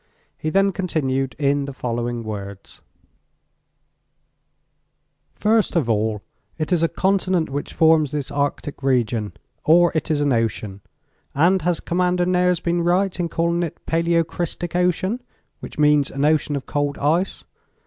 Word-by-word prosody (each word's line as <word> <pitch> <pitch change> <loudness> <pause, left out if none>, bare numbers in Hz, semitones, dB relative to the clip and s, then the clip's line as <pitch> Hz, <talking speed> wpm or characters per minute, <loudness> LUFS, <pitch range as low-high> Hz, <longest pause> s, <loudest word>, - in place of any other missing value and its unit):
He 155 - -3
then 195 +3 +3
continued 135 -8 -1
in 140 -1 +1
the 140 - -6
following 120 -1 -3
words: 100 -2 -8 2.5
"First 215 -2 +1
of 160 -8 +2
all, 110 -1 -1 0.3
it 160 +3 -1
is 170 - +2
a 165 - +4
continent 185 -4 0
which 145 +1 -4
forms 160 -2 +4
this 145 -2 -3
arctic 145 0 -2
region, 120 -5 0 0.3
or 175 +2 +5
it 160 +1 -2
is 155 -2 +1
an 145 -2 +2
ocean, 110 -4 -2 0.5
and 175 +6 +3
has 175 -1 0
Commander 180 0 0
Nares 180 -1 +2
been 170 0 0
right 180 +2 +1
in 170 -1 -1
calling 170 +1 0
it 170 -3 -3
'paleocrystic 170 +1 -1
ocean,' 180 +6 0 0.4
which - - -10
means 150 -1 +4
an 140 +1 -1
ocean 150 -1 +2
of 140 - -3
old 145 0 0
ice? 165 +6 0
155 Hz, 140 wpm, -22 LUFS, 135-175 Hz, 2.5 s, or